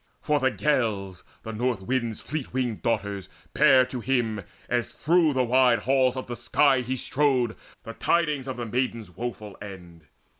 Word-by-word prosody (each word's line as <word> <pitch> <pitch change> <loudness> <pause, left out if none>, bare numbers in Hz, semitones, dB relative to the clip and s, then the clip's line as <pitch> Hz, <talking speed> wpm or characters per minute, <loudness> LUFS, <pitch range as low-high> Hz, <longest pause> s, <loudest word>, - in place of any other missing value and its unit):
For 150 -1 +1
the 130 -1 +3
Gales, 110 -10 -1 0.2
The 110 - -6
North 115 -3 -1
wind's 120 -1 -2
fleet 150 -2 -5
winged 125 -4 -1
daughters, 100 -4 -2 0.2
bare 135 -4 +6
to 130 0 -6
him, 115 -3 0 0.3
As 120 -1 -1
through 165 0 +3
the 130 -1 +2
wide 125 -1 +3
halls 130 -1 +2
of 130 - -4
the 120 - -5
sky 135 +1 +3
he 125 +2 -2
strode, 130 -3 +1 0.3
The 115 - -7
tidings 150 -2 0
of 130 -2 -4
the 120 - -3
maiden's 115 -4 -2
woeful 110 -2 -6
end. 90 -5 -10
125 Hz, 165 wpm, -26 LUFS, 110-130 Hz, 0.3 s, bare